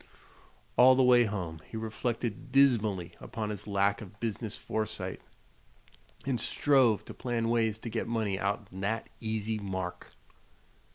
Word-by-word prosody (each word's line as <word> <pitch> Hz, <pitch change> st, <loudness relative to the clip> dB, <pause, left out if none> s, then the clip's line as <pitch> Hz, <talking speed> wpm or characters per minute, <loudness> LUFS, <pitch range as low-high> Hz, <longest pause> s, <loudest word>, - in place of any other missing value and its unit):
All 130 Hz, +1 st, +8 dB
the 130 Hz, -, +4 dB
way 125 Hz, -1 st, +6 dB
home 90 Hz, -7 st, -4 dB
he 110 Hz, -, -5 dB
reflected 110 Hz, 0 st, -3 dB
dismally 110 Hz, -10 st, +3 dB
upon 110 Hz, -2 st, -4 dB
his 105 Hz, -1 st, -6 dB
lack 100 Hz, 0 st, +2 dB
of 100 Hz, -1 st, -11 dB
business 110 Hz, -1 st, -3 dB
foresight, 110 Hz, -1 st, -3 dB, 1.0 s
and 130 Hz, -3 st, 0 dB
strove 120 Hz, -5 st, +3 dB
to -, -, -8 dB
plan 120 Hz, -2 st, -1 dB
ways 115 Hz, -2 st, +2 dB
to 115 Hz, -, -6 dB
get 115 Hz, -, -2 dB
money 110 Hz, -4 st, -1 dB
"out'n 100 Hz, -1 st, -3 dB
thet 110 Hz, +3 st, -1 dB
easy 110 Hz, -1 st, -2 dB
mark." 95 Hz, -3 st, -5 dB
110 Hz, 135 wpm, -30 LUFS, 100-120 Hz, 1.0 s, All